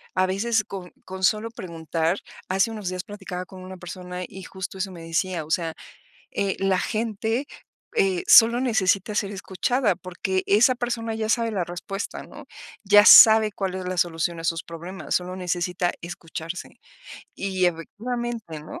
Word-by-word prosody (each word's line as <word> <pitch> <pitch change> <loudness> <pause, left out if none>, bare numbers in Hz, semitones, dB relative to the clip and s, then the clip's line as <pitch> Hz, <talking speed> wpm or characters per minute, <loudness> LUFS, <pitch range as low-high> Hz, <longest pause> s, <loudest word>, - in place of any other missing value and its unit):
a 185 - +3
veces 215 +4 +1
con 190 -3 -8
con 190 0 -7
solo 215 +4 +2
preguntar. 165 -2 -2 0.3
Hace 195 +5 +2
unos 210 -4 -6
días 185 0 -4
platicaba 190 -3 -7
con 185 0 -12
una 185 0 -8
persona, 180 0 -7
y 190 -1 -10
justo 190 +1 -7
eso 190 0 -3
me 175 -2 -10
decía: 170 0 -1
"O 150 - -13
sea, 165 -1 0 0.6
eh, 195 -1 0
la 195 -1 +2
gente, 225 +4 -1 0.5
eh, 190 -2 +2
solo 235 +1 +8
necesita 210 -4 +1
ser 200 -1 0
escuchada, 200 +3 0
porque 185 +1 -3
esa 230 +6 +5
persona 235 -2 -3
ya 220 -1 -2
sabe 230 0 +1
la 190 -4 0
respuesta, 175 +3 -6
¿no? - - -12 0.4
Ya 205 +1 +7
sabe 220 -3 +9
cuál 190 -2 -3
es 185 - -5
la 185 0 -3
solución 170 0 0
a 165 - -8
sus 165 -1 -1
problemas, 170 +1 -6
solo 180 +1 -1
necesita 180 0 -1
escucharse". 170 0 -7 0.6
Y 190 -2 0
efectivamente, 220 +1 -4
¿no? 150 - -9
190 Hz, 165 wpm, -24 LUFS, 180-215 Hz, 0.6 s, sabe